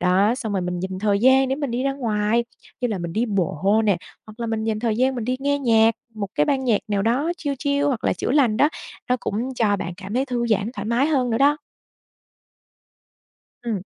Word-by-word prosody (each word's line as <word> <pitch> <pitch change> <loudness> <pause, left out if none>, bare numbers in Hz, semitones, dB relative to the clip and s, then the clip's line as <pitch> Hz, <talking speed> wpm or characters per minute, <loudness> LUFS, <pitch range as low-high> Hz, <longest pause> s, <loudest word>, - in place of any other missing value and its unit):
Đó, 195 +5 +3
xong 230 -5 -4
rồi 195 - 0
mình 180 0 -3
dành 190 0 -4
thời 200 -1 +1
gian 260 +3 +5
để 265 - +1
mình 285 -4 -3
đi 240 +2 -1
ra 275 0 +1
ngoài 230 -3 0 0.4
như 245 - 0
là 210 -4 -2
mình 170 -1 -5
đi 230 +5 0
bộ 195 +1 +1
nè, 200 -4 +3 0.3
hoặc 215 +2 -13
là 235 - -2
mình 225 -1 -2
dành 220 -1 -1
thời 225 -3 0
gian 260 +2 +2
mình 240 -3 -3
đi 255 +1 -1
nghe 285 +1 +1
nhạc, 225 -4 +4 0.2
một 205 -2 -4
cái 150 - +2
ban 265 -1 0
nhạc 230 -5 +3
nào 200 -2 0
đó 260 +10 +1
chill 285 -4 -3
chill 285 0 0
hoặc 255 -5 -1
là - - +3
chữa - - -3
lành 255 -7 +3
đó, 290 - +4 0.4
nó 250 - +3
cũng 245 +5 -3
cho 210 -4 +2
bạn 175 -2 -5
cảm 200 +2 -7
thấy 260 +2 +1
thư 240 -3 -1
giãn, 215 -1 +1
thoải 205 -5 -6
mái 240 +5 +2
hơn 260 -6 +1
nữa 225 - +1
đó. 290 +2 +4 2.0
Ừm. 220 -6 -3
230 Hz, 235 wpm, -22 LUFS, 205-260 Hz, 2.0 s, gian